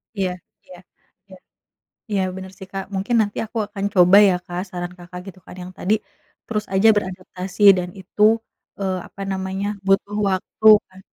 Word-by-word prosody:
Iya 190 Hz, -2 st, 0 dB, 0.4 s
iya 180 Hz, -1 st, -13 dB, 0.5 s
iya. 190 Hz, -1 st, -14 dB, 0.7 s
Iya, 200 Hz, -2 st, +1 dB, 0.2 s
bener 190 Hz, 0 st, -8 dB
sih, 190 Hz, -, -9 dB
Kak, 195 Hz, 0 st, -4 dB
mungkin 205 Hz, +5 st, 0 dB
nanti 205 Hz, -1 st, -4 dB
aku 225 Hz, +1 st, -6 dB
akan 200 Hz, -1 st, -5 dB
coba 180 Hz, +1 st, +6 dB
ya, 185 Hz, -, +3 dB
Kak, 175 Hz, 0 st, -4 dB
saran 175 Hz, 0 st, -5 dB
Kakak 180 Hz, +1 st, -9 dB
gitu 185 Hz, -1 st, -12 dB
kan -, -, -11 dB
yang 180 Hz, +1 st, -9 dB
tadi 210 Hz, +4 st, +1 dB, 0.5 s
terus 215 Hz, -2 st, -2 dB
aja 205 Hz, +4 st, +5 dB
beradaptasi 185 Hz, 0 st, -5 dB, 0.2 s
dan 180 Hz, 0 st, -3 dB
itu, 200 Hz, +3 st, -4 dB, 0.6 s
eee, 190 Hz, -1 st, -1 dB
apa 195 Hz, -, -10 dB
namanya, 190 Hz, +1 st, -3 dB, 0.2 s
butuh 200 Hz, +1 st, +1 dB
waktu 190 Hz, +3 st, -3 dB, 0.2 s
kan. 185 Hz, 0 st, -16 dB
190 Hz, 165 wpm, -21 LUFS, 180-200 Hz, 0.7 s, coba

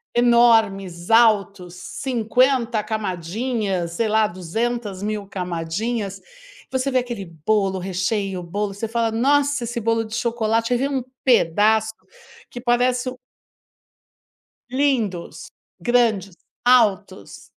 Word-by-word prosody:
enormes, 220 Hz, -7 st, +3 dB
altos, 200 Hz, -6 st, +3 dB, 0.3 s
cinquenta 245 Hz, -1 st, +1 dB
camadinhas, 200 Hz, -1 st, -2 dB
sei 225 Hz, +5 st, 0 dB
lá, 215 Hz, 0 st, +3 dB
duzentas 205 Hz, +3 st, -3 dB
mil 210 Hz, -1 st, -3 dB
camadinhas. 195 Hz, +4 st, -3 dB, 0.5 s
Você 260 Hz, +1 st, 0 dB
vê 255 Hz, -, +3 dB
aquele 240 Hz, -5 st, -5 dB, 0.2 s
bolo, 195 Hz, -3 st, +1 dB
recheio, 190 Hz, +1 st, -2 dB
bolo, 200 Hz, +4 st, -3 dB
você 210 Hz, +3 st, -4 dB
fala: 230 Hz, 0 st, 0 dB
"Nossa, 280 Hz, +3 st, +2 dB
esse 240 Hz, +1 st, -3 dB
bolo 230 Hz, 0 st, 0 dB
de 220 Hz, +1 st, -6 dB
chocolate!". 230 Hz, -1 st, 0 dB
Você 245 Hz, -, +2 dB
vê 270 Hz, +3 st, 0 dB
um 270 Hz, -3 st, -2 dB, 0.2 s
pedaço 220 Hz, -1 st, +3 dB, 0.6 s
que 245 Hz, -, -8 dB
parece 250 Hz, +1 st, +1 dB
um 255 Hz, -, -9 dB, 1.5 s
Lindos, 250 Hz, -10 st, -1 dB, 0.3 s
grandes, 220 Hz, -7 st, +1 dB, 0.3 s
altos. 220 Hz, -5 st, +1 dB
220 Hz, 110 wpm, -22 LUFS, 195-240 Hz, 1.5 s, enormes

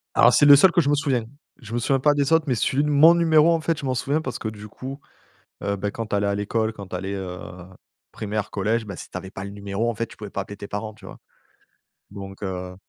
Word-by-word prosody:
Alors, -, -, +6 dB
c'est 145 Hz, -, +5 dB
le 145 Hz, -, +10 dB
seul 170 Hz, +6 st, +6 dB
que 175 Hz, -, +3 dB
je 145 Hz, -, 0 dB
me 145 Hz, -, +4 dB
souviens. 135 Hz, -5 st, 0 dB, 0.3 s
Je 115 Hz, -4 st, -11 dB
me 120 Hz, -, 0 dB
souviens 135 Hz, +2 st, +1 dB
pas 145 Hz, +2 st, +4 dB
des 145 Hz, +1 st, +1 dB
autres, 160 Hz, -1 st, +4 dB
mais 130 Hz, -, +1 dB
celui 135 Hz, +5 st, +1 dB
de 150 Hz, -, 0 dB
mon 155 Hz, +4 st, +7 dB
numéro, 165 Hz, -1 st, +4 dB
en 165 Hz, -, 0 dB
fait, 160 Hz, 0 st, 0 dB
je 140 Hz, -, -6 dB
m'en 130 Hz, -1 st, 0 dB
souviens 145 Hz, +6 st, 0 dB
parce 130 Hz, -, -5 dB
que -, -, -4 dB
du 105 Hz, -1 st, -7 dB
coup, 135 Hz, +6 st, -8 dB, 0.6 s
heu, 100 Hz, 0 st, -1 dB
bah, 100 Hz, +1 st, -2 dB
quand 115 Hz, +1 st, -5 dB
tu 105 Hz, -, -1 dB
allais 100 Hz, 0 st, +1 dB
à 100 Hz, -, +1 dB
l'école, 110 Hz, +2 st, -1 dB
quand 100 Hz, -3 st, -10 dB
tu 90 Hz, -, -4 dB
allais, 95 Hz, +2 st, -4 dB
heu, 95 Hz, -2 st, -5 dB, 0.7 s
primaire, 105 Hz, -1 st, -4 dB
collège, 110 Hz, +3 st, 0 dB
bah, 100 Hz, -3 st, -7 dB
si -, -, -9 dB
tu -, -, -7 dB
avais 95 Hz, +1 st, -9 dB
pas 95 Hz, 0 st, -7 dB
le 100 Hz, -, -6 dB
numéro, 100 Hz, +2 st, -3 dB
en -, -, -4 dB
fait, 115 Hz, +2 st, -3 dB
tu -, -, -15 dB
pouvais 105 Hz, -2 st, -8 dB
pas 100 Hz, -, -3 dB
appeler 100 Hz, +1 st, -10 dB
tes 100 Hz, -, -9 dB
parents, 110 Hz, +1 st, -5 dB
tu 105 Hz, -, -14 dB
vois? -, -, -11 dB, 0.9 s
Donc 100 Hz, 0 st, -9 dB
heu 90 Hz, -1 st, -4 dB
110 Hz, 280 wpm, -23 LUFS, 100-140 Hz, 0.9 s, le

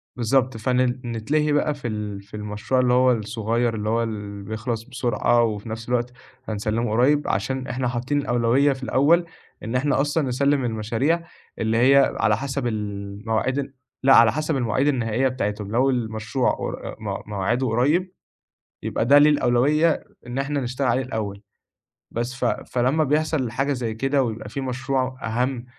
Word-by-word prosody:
بالضبط، 125 Hz, 0 st, +1 dB
فن 125 Hz, +3 st, 0 dB, 0.3 s
نتلهي 140 Hz, +7 st, 0 dB
بقى 145 Hz, +1 st, +2 dB
في 140 Hz, -4 st, -6 dB
ال 105 Hz, -2 st, -4 dB
في 100 Hz, -, -24 dB
المشروع 105 Hz, +5 st, -2 dB
اللي 125 Hz, -1 st, +2 dB
هو 125 Hz, 0 st, +5 dB
الصغير 115 Hz, +1 st, -1 dB
اللي 105 Hz, 0 st, -2 dB
هو 115 Hz, +1 st, +1 dB
ال 105 Hz, -3 st, -5 dB
بيخلص 110 Hz, +2 st, -4 dB
بسرعة 120 Hz, -2 st, +1 dB
وفي 110 Hz, -1 st, -2 dB
نَفْس 115 Hz, +1 st, -6 dB
الوقت 125 Hz, 0 st, 0 dB, 0.4 s
هنسلِّمه 110 Hz, +2 st, -1 dB
قريّب 135 Hz, +6 st, +3 dB
عشان 130 Hz, +6 st, -1 dB
إحنا 125 Hz, 0 st, -2 dB
حاطّين 125 Hz, +4 st, -1 dB
الأولوية 130 Hz, +2 st, +2 dB
في 130 Hz, 0 st, -10 dB
الأول 160 Hz, +7 st, +3 dB, 0.4 s
إن 115 Hz, +3 st, -4 dB
إحنا 135 Hz, +2 st, +2 dB
أصلًا 145 Hz, 0 st, 0 dB
نسلِّم 140 Hz, +1 st, +1 dB
المشاريع 120 Hz, +9 st, -1 dB, 0.3 s
اللي 110 Hz, 0 st, +1 dB
هي 135 Hz, +3 st, +5 dB
على 105 Hz, +1 st, +3 dB
حَسَب 135 Hz, -1 st, -3 dB
ال 115 Hz, -, -1 dB, 0.5 s
المواعيد 115 Hz, +5 st, 0 dB
ال 140 Hz, 0 st, -5 dB, 0.3 s
لأ، 135 Hz, 0 st, +6 dB
على 115 Hz, -2 st, +7 dB
حَسَب 155 Hz, +2 st, -1 dB
المواعيد 130 Hz, +3 st, +1 dB
النهائية 120 Hz, -1 st, +1 dB
بتاعتهم 105 Hz, -5 st, -3 dB
لو 130 Hz, +4 st, +3 dB
المشروع 115 Hz, 0 st, 0 dB
و -, -, -2 dB
آآ -, -, -7 dB
م -, -, -5 dB
موعده 110 Hz, +6 st, 0 dB
قريّب 150 Hz, +11 st, +1 dB, 0.7 s
يبقى -, -, -1 dB
ده 140 Hz, +3 st, +7 dB
ليه 150 Hz, +1 st, +6 dB
الأولوية 145 Hz, +4 st, +2 dB, 0.2 s
إن 120 Hz, +2 st, -4 dB
إحنا 140 Hz, +1 st, -1 dB
نشتغل 130 Hz, +2 st, -2 dB
عليه 125 Hz, +2 st, +2 dB
الأول. 105 Hz, -5 st, -4 dB, 0.7 s
بس، 120 Hz, +3 st, -3 dB
ف 130 Hz, -, -3 dB
فلما 130 Hz, +5 st, +1 dB
بيحصل 150 Hz, -3 st, 0 dB
حاجة 135 Hz, +4 st, 0 dB
زي 120 Hz, -4 st, -3 dB
كده 135 Hz, +4 st, +1 dB
ويبقى 110 Hz, -3 st, -4 dB
في 135 Hz, +5 st, -5 dB
مشروع 130 Hz, 0 st, -2 dB
أهَم، 125 Hz, +2 st, -1 dB
125 Hz, 170 wpm, -23 LUFS, 110-135 Hz, 0.7 s, على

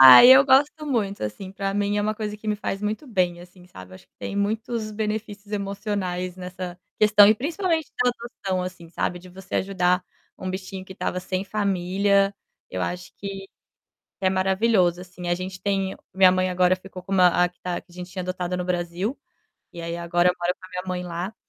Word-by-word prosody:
Ai, 130 Hz, -, +11 dB
eu 265 Hz, +1 st, +9 dB
gosto 285 Hz, +3 st, +3 dB
muito, 210 Hz, -8 st, -1 dB
assim. 185 Hz, -, -5 dB
Pra 195 Hz, 0 st, -2 dB
mim 205 Hz, 0 st, +1 dB
é -, -, +2 dB
uma 215 Hz, +1 st, 0 dB
coisa 210 Hz, -1 st, -4 dB
que 215 Hz, 0 st, -7 dB
me 210 Hz, -, +1 dB
faz 195 Hz, -1 st, -3 dB
muito 215 Hz, +7 st, -2 dB
bem, 180 Hz, -6 st, 0 dB
assim, 180 Hz, 0 st, -15 dB
sabe, 95 Hz, -, -12 dB
acho 95 Hz, -, -15 dB
que -, -, -56 dB
tem -, -, -5 dB
muitos 220 Hz, +2 st, -1 dB
benefícios 210 Hz, -1 st, -4 dB
emocionais 195 Hz, -3 st, -3 dB
nessa 180 Hz, -1 st, -6 dB, 0.2 s
questão 210 Hz, -1 st, +7 dB
e 215 Hz, -, +6 dB
principalmente 325 Hz, -, -1 dB
da 250 Hz, -, +4 dB
adoção, 205 Hz, -6 st, -4 dB
assim, 180 Hz, -2 st, -7 dB
sabe 175 Hz, +1 st, -2 dB
de 180 Hz, +1 st, -14 dB
você 185 Hz, +1 st, -5 dB
ajudar 180 Hz, -1 st, +1 dB, 0.4 s
um 185 Hz, -, -4 dB
bichinho 185 Hz, 0 st, -6 dB
que 190 Hz, -, -11 dB
tava 180 Hz, 0 st, -2 dB
sem 185 Hz, +1 st, -3 dB
família, 200 Hz, 0 st, +1 dB, 0.4 s
eu 95 Hz, -, -3 dB
acho 180 Hz, -, -4 dB
que, 195 Hz, -1 st, -7 dB, 0.7 s
é 190 Hz, -, +3 dB
maravilhoso, 190 Hz, -1 st, +2 dB
assim, 180 Hz, -1 st, -8 dB
a 175 Hz, -, +3 dB
gente 185 Hz, +1 st, -6 dB
tem 195 Hz, -1 st, 0 dB, 0.2 s
minha 190 Hz, -1 st, +7 dB
mãe 185 Hz, 0 st, +1 dB
agora 180 Hz, 0 st, +4 dB
ficou 185 Hz, 0 st, -10 dB
com 190 Hz, +2 st, -7 dB
uma 185 Hz, -2 st, +6 dB, 0.2 s
a 180 Hz, -, +1 dB
que 180 Hz, -, -28 dB
tá 180 Hz, -1 st, -3 dB
a -, -, -9 dB
gente 180 Hz, 0 st, -8 dB
tinha 185 Hz, 0 st, -4 dB
adotado 180 Hz, 0 st, -3 dB
no 180 Hz, -, -2 dB
Brasil, 180 Hz, +6 st, -2 dB, 0.5 s
e 170 Hz, -, -7 dB
aí 170 Hz, 0 st, -3 dB
agora 175 Hz, +1 st, +2 dB
eu 180 Hz, -, +2 dB
moro 175 Hz, +1 st, +1 dB
com -, -, -11 dB
a -, -, -18 dB
minha 180 Hz, 0 st, -4 dB
mãe 180 Hz, -1 st, -2 dB
lá, 180 Hz, +4 st, -4 dB
190 Hz, 205 wpm, -24 LUFS, 180-205 Hz, 0.7 s, Ai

